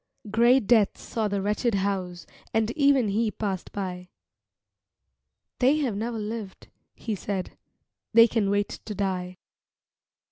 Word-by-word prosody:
Gray 235 +4 +5
Death 220 -3 +3
saw 220 -2 -3
the 200 -1 -2
wretched 210 +2 0
house 185 -4 -2 0.3
And 225 0 +2
even 275 -5 +3
he 220 +3 +1
passed 200 -4 -4
by 180 -2 -5 1.5
"They 265 +4 +4
have 265 -9 -1
never 225 +3 -3
lived," 210 -2 -6 0.3
he 220 - -4
said, 195 -1 -4 0.6
"They 230 0 +8
can 220 -4 0
wait 205 0 -1
to 210 - -5
die." 185 -2 -2
210 Hz, 130 wpm, -26 LUFS, 195-230 Hz, 1.5 s, They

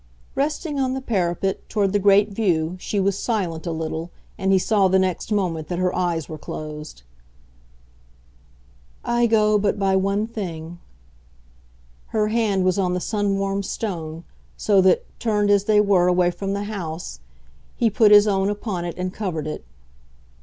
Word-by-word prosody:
Resting 295 +1 -2
on 260 -1 0
the - - -2
parapet; 195 -6 -2
toward 200 -2 0
the 205 - +3
great 200 +1 +4
view, 180 -5 0
she 205 - -2
was 195 0 +1
silent 180 -8 -2
a - - -1
little, 160 +1 -4 0.3
and 190 0 0
he 190 - +5
saw 195 +1 +3
the 190 +1 +3
next 190 +2 -1
moment 175 -7 -1
that 175 - -3
her 180 0 0
eyes 170 -4 -1
were 155 -1 -8
closed. 150 - -8 2.0
"I 240 0 +2
go 215 -2 +3
but 205 +1 0
by 195 -1 +1
one 200 +2 +1
thing." 175 -7 -6 1.3
Her 215 -1 0
hand 215 -4 +1
was 185 +1 +2
on 180 -2 +1
the - - -1
sun 205 0 -1
warmed 195 0 -1
stone; 165 -7 -4 0.3
so 200 -2 +3
that, 185 -1 +3
turned 210 -3 +1
as 200 -1 +3
they 210 -1 +4
were 195 -4 +4
away 180 0 +3
from 195 +2 -4
the 200 0 -2
house, 170 - -6 0.6
he 230 -2 +1
put 215 +1 +5
his 205 0 +8
own 195 -1 +1
upon 205 -4 -3
it 170 -1 -5
and 180 0 -3
covered 180 -9 -3
it. 155 - -5
195 Hz, 165 wpm, -22 LUFS, 175-210 Hz, 2.0 s, his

